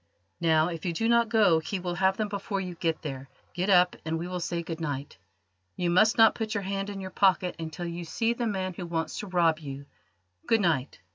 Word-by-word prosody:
Now, 160 Hz, -1 st, +3 dB
if 165 Hz, -2 st, -6 dB
you 175 Hz, -, -1 dB
do 225 Hz, +7 st, 0 dB
not 235 Hz, -1 st, +3 dB
go 210 Hz, -8 st, +4 dB
he 175 Hz, +5 st, -4 dB
will 180 Hz, -1 st, -3 dB
have 190 Hz, +2 st, +2 dB
them 215 Hz, -, 0 dB
before 200 Hz, 0 st, -3 dB
you 180 Hz, -2 st, -4 dB
get 165 Hz, -1 st, -2 dB
there. 135 Hz, -3 st, -6 dB, 0.2 s
Get 180 Hz, +3 st, -1 dB
up 180 Hz, -2 st, +5 dB
and 160 Hz, +1 st, -2 dB
we 170 Hz, +2 st, -4 dB
will 180 Hz, 0 st, -4 dB
say 170 Hz, 0 st, -2 dB
good 165 Hz, 0 st, -6 dB
night. 145 Hz, -8 st, -4 dB, 0.6 s
You 175 Hz, -1 st, 0 dB
must 215 Hz, +5 st, +4 dB
not 225 Hz, -1 st, +7 dB
put 220 Hz, -1 st, -3 dB
your 200 Hz, -, -1 dB
hand 195 Hz, +1 st, -3 dB
in 200 Hz, -1 st, -6 dB
your 185 Hz, 0 st, -6 dB
pocket 185 Hz, -2 st, +2 dB
until 165 Hz, +2 st, -5 dB
you 170 Hz, 0 st, -5 dB
see 225 Hz, +8 st, 0 dB
the 235 Hz, 0 st, -2 dB
man 190 Hz, -3 st, -2 dB
who 175 Hz, 0 st, -6 dB
wants 165 Hz, -1 st, -3 dB
to 210 Hz, -, -5 dB
rob 170 Hz, -3 st, +2 dB
you. 140 Hz, -2 st, -8 dB, 0.6 s
Good 225 Hz, -2 st, +3 dB
night. 155 Hz, -, 0 dB
180 Hz, 230 wpm, -28 LUFS, 165-200 Hz, 0.6 s, not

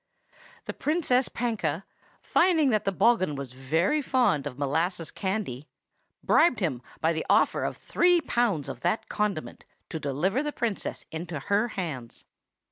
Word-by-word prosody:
"The -, -, -4 dB
Princess 290 Hz, -5 st, +1 dB
Panka, 195 Hz, -9 st, -2 dB, 0.4 s
finding 325 Hz, -6 st, +3 dB
that 215 Hz, -2 st, +1 dB
the 195 Hz, -, +2 dB
bogghun 195 Hz, -5 st, +3 dB
was 135 Hz, -3 st, -6 dB
very 160 Hz, -, +1 dB
fond 235 Hz, -, +2 dB
of 130 Hz, -3 st, -7 dB
molasses 160 Hz, +4 st, -1 dB
candy, 190 Hz, -, -3 dB, 0.6 s
bribed 255 Hz, -, +4 dB
him 150 Hz, -, -1 dB, 0.2 s
by 160 Hz, +1 st, +2 dB
the 160 Hz, -, -2 dB
offer -, -, +3 dB
of -, -, -2 dB
three 355 Hz, 0 st, +3 dB
pounds 235 Hz, -, 0 dB
of 135 Hz, -3 st, -6 dB
that 175 Hz, -, -1 dB
condiment 210 Hz, -7 st, -2 dB, 0.3 s
to 160 Hz, -, -4 dB
deliver 155 Hz, -, 0 dB
the 295 Hz, 0 st, -2 dB
Princess 230 Hz, -7 st, -3 dB
into 160 Hz, 0 st, -5 dB
her 205 Hz, -, +1 dB
hands. 155 Hz, -, -6 dB
185 Hz, 145 wpm, -27 LUFS, 150-240 Hz, 0.6 s, bribed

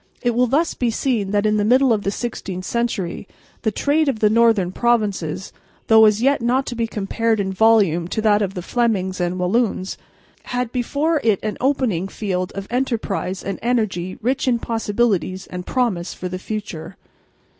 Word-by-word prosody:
It 240 Hz, -, +2 dB
will 250 Hz, +2 st, +3 dB
thus 305 Hz, +7 st, +1 dB
be 245 Hz, -, 0 dB
seen 230 Hz, -3 st, -1 dB
that 205 Hz, +1 st, +1 dB
in 215 Hz, 0 st, +2 dB
the 205 Hz, -, +1 dB
middle 255 Hz, +3 st, +4 dB
of 210 Hz, -, 0 dB
the 200 Hz, -, -1 dB
sixteenth 195 Hz, -4 st, -5 dB
century 210 Hz, -6 st, -2 dB, 0.3 s
the 220 Hz, -, +1 dB
trade 290 Hz, +7 st, +1 dB
of 260 Hz, -, -1 dB
the 215 Hz, -1 st, +3 dB
northern 225 Hz, -5 st, +3 dB
provinces, 200 Hz, -7 st, -1 dB, 0.3 s
though 220 Hz, 0 st, +7 dB
as 215 Hz, +2 st, +3 dB
yet 275 Hz, 0 st, +3 dB
not 255 Hz, +3 st, +1 dB
to 240 Hz, -, -5 dB
be 230 Hz, -1 st, -1 dB
compared 220 Hz, +1 st, -1 dB
in 190 Hz, -1 st, -1 dB
volume 195 Hz, -5 st, +3 dB
to 220 Hz, -, -2 dB
that 210 Hz, -1 st, +4 dB
of 195 Hz, -1 st, -2 dB
the 180 Hz, -, -4 dB
Flemings 190 Hz, -5 st, 0 dB
and 175 Hz, +1 st, -1 dB
Walloons, 190 Hz, +1 st, 0 dB, 0.5 s
had 250 Hz, -1 st, -2 dB
before 285 Hz, +5 st, 0 dB
it 215 Hz, -4 st, +3 dB
an 215 Hz, -, -2 dB
opening 250 Hz, -9 st, +1 dB
field 185 Hz, -3 st, -3 dB
for -, -, -6 dB
enterprise 225 Hz, -7 st, -2 dB
and 195 Hz, -1 st, -4 dB
energy 215 Hz, -7 st, -1 dB
rich 265 Hz, +3 st, 0 dB
in 245 Hz, -2 st, +3 dB
possibilities 210 Hz, -5 st, -1 dB
and 180 Hz, 0 st, -7 dB
promise 215 Hz, -9 st, -1 dB
for 185 Hz, -, -5 dB
the 185 Hz, 0 st, -5 dB
future. 190 Hz, -5 st, -6 dB
215 Hz, 180 wpm, -21 LUFS, 190-240 Hz, 0.5 s, though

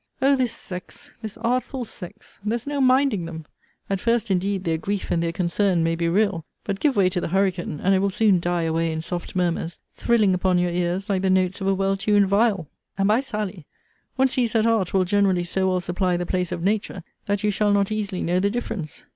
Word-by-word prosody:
O 275 Hz, +1 st, +4 dB
this 255 Hz, -3 st, 0 dB
sex! 180 Hz, -2 st, -9 dB
this 220 Hz, -1 st, -7 dB
artful 250 Hz, +2 st, -1 dB
sex! 205 Hz, +1 st, -11 dB
there's 225 Hz, +3 st, -2 dB
no 285 Hz, -1 st, -1 dB
minding 255 Hz, -7 st, +3 dB
them. 160 Hz, -1 st, -7 dB, 0.4 s
At 195 Hz, -1 st, -1 dB
first, 230 Hz, -1 st, +1 dB
indeed, 190 Hz, +1 st, 0 dB
their 160 Hz, -2 st, 0 dB
grief 200 Hz, +3 st, -3 dB
and 165 Hz, -, +1 dB
their 170 Hz, 0 st, 0 dB
concern 175 Hz, 0 st, +1 dB
may 165 Hz, 0 st, +1 dB
be 170 Hz, 0 st, 0 dB
real: 195 Hz, -2 st, +1 dB, 0.2 s
but, 200 Hz, -1 st, -3 dB
give 290 Hz, -4 st, +2 dB
way 195 Hz, -2 st, +4 dB
to 180 Hz, -1 st, -2 dB
the -, -, -2 dB
hurricane, 180 Hz, -4 st, 0 dB
and 195 Hz, -, +2 dB
it 190 Hz, -, +3 dB
will 200 Hz, +1 st, +1 dB
soon 200 Hz, -1 st, +3 dB
die 175 Hz, 0 st, -1 dB
away 165 Hz, 0 st, 0 dB
in 160 Hz, 0 st, -3 dB
soft 175 Hz, +2 st, -5 dB
murmurs, 175 Hz, -2 st, -1 dB, 0.2 s
thrilling 220 Hz, -5 st, +3 dB
upon 180 Hz, 0 st, +2 dB
your 175 Hz, 0 st, +1 dB
ears 180 Hz, +3 st, -1 dB
like 195 Hz, -3 st, 0 dB
the 190 Hz, -, +1 dB
notes 185 Hz, 0 st, +1 dB
of 195 Hz, -, -1 dB
a 195 Hz, -, +3 dB
well 195 Hz, 0 st, +1 dB
tuned 205 Hz, +1 st, +3 dB
viol. 200 Hz, -3 st, +2 dB, 0.3 s
And, 195 Hz, 0 st, +2 dB
by 215 Hz, +3 st, +4 dB
Sally, 210 Hz, -, -5 dB, 0.5 s
one 265 Hz, 0 st, +4 dB
sees 250 Hz, -3 st, 0 dB
that 225 Hz, -1 st, +3 dB
art 225 Hz, -6 st, +2 dB
will 190 Hz, -1 st, +2 dB
generally 190 Hz, -2 st, +2 dB
so 190 Hz, +2 st, 0 dB
well 185 Hz, 0 st, +1 dB
supply 180 Hz, 0 st, 0 dB
the 175 Hz, -, -2 dB
place 180 Hz, -1 st, -1 dB
of 170 Hz, -, -3 dB
nature, 200 Hz, -2 st, -1 dB, 0.2 s
that 205 Hz, +1 st, 0 dB
you 210 Hz, -, +2 dB
shall 205 Hz, +1 st, +1 dB
not 200 Hz, 0 st, +2 dB
easily 205 Hz, -3 st, -2 dB
know 175 Hz, +2 st, +1 dB
the 200 Hz, +2 st, +2 dB
difference. 200 Hz, -9 st, -5 dB
195 Hz, 225 wpm, -23 LUFS, 175-215 Hz, 0.5 s, O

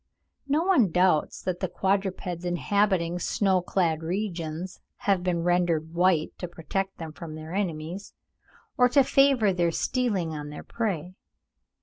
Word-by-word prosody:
No 295 Hz, +4 st, +2 dB
one 345 Hz, -, +4 dB
doubts 180 Hz, -2 st, +2 dB
that 180 Hz, -1 st, -2 dB
the 185 Hz, -, -1 dB
quadrupeds 190 Hz, -2 st, -1 dB
inhabiting 180 Hz, -1 st, +1 dB
snow 190 Hz, 0 st, +1 dB
clad 170 Hz, -3 st, 0 dB
regions 175 Hz, -1 st, -4 dB, 0.3 s
have 195 Hz, -3 st, +3 dB
been 175 Hz, -2 st, -1 dB
rendered 170 Hz, -2 st, +1 dB
white 175 Hz, -2 st, +2 dB
to 180 Hz, -, -4 dB
protect 190 Hz, +3 st, -4 dB
them 160 Hz, -2 st, -6 dB
from 155 Hz, -1 st, -8 dB
their 155 Hz, +2 st, -8 dB
enemies, 180 Hz, -1 st, -4 dB, 0.6 s
or 250 Hz, 0 st, +6 dB
to 275 Hz, +2 st, +5 dB
favour 260 Hz, -7 st, +4 dB
their 175 Hz, -1 st, +2 dB
stealing 195 Hz, -3 st, 0 dB
on 150 Hz, -1 st, -6 dB
their 150 Hz, -, -8 dB
prey. 185 Hz, -7 st, -3 dB
180 Hz, 140 wpm, -27 LUFS, 165-200 Hz, 0.6 s, or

